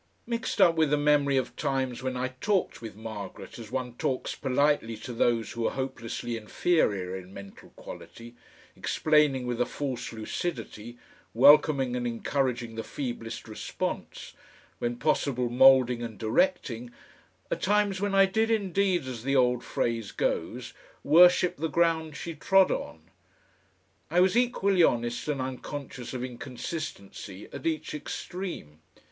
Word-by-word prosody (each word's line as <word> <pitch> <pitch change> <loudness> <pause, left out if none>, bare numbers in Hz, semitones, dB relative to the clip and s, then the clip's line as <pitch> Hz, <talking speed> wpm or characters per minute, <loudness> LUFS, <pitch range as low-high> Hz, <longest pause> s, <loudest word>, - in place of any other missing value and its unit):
Mixed 235 -1 -3
up 170 - +7
with 160 -2 +3
the 150 - +3
memory 145 -2 +3
of 130 - -2
times 135 -3 -1
when 130 -1 -3
I 130 +1 -1
talked 180 +9 -1
with 110 -3 -8
Margaret 110 0 -8
as 110 -2 -9
one 125 -2 -3
talks 130 - -1
politely 135 -4 +1
to 120 +3 -7
those 115 -1 +1
who 115 -1 -1
are - - -2
hopelessly 120 -3 -4
inferior 105 - 0
in 95 0 -9
mental 100 0 -11
quality, 120 +1 -11 0.4
explaining 150 -4 +2
with 125 -1 -2
a - - +3
false 130 -4 -4
lucidity, 115 -1 -5 0.4
welcoming 140 -1 +6
and 120 -1 -1
encouraging 120 0 -1
the 115 0 -4
feeblest 120 -4 -5
response, 110 - -5 0.5
when 120 0 -1
possible 125 -3 0
moulding 125 -1 +6
and 115 -3 -6
directing, 120 - 0 0.6
are - - +1
times 205 -1 +1
when 205 -1 0
I 195 0 +7
did 220 +4 +1
indeed, 195 -6 +1
as 125 -3 -6
the 135 +1 0
old 125 -2 +3
phrase 115 -3 -2
goes, - - -2 0.3
worship 180 +4 +6
the 160 +3 -1
ground 160 -1 +1
she 170 - -5
trod 190 +5 +4
on. 80 - -4 1.1
I 170 +3 +2
was 185 +3 +4
equally 200 -6 +2
honest 120 -3 +1
and 145 -2 -1
unconscious 130 0 -6
of 125 -1 -4
inconsistency 120 - -7
at - - -4
each 155 -1 -2
extreme. 150 - -6
130 Hz, 140 wpm, -28 LUFS, 120-160 Hz, 1.1 s, up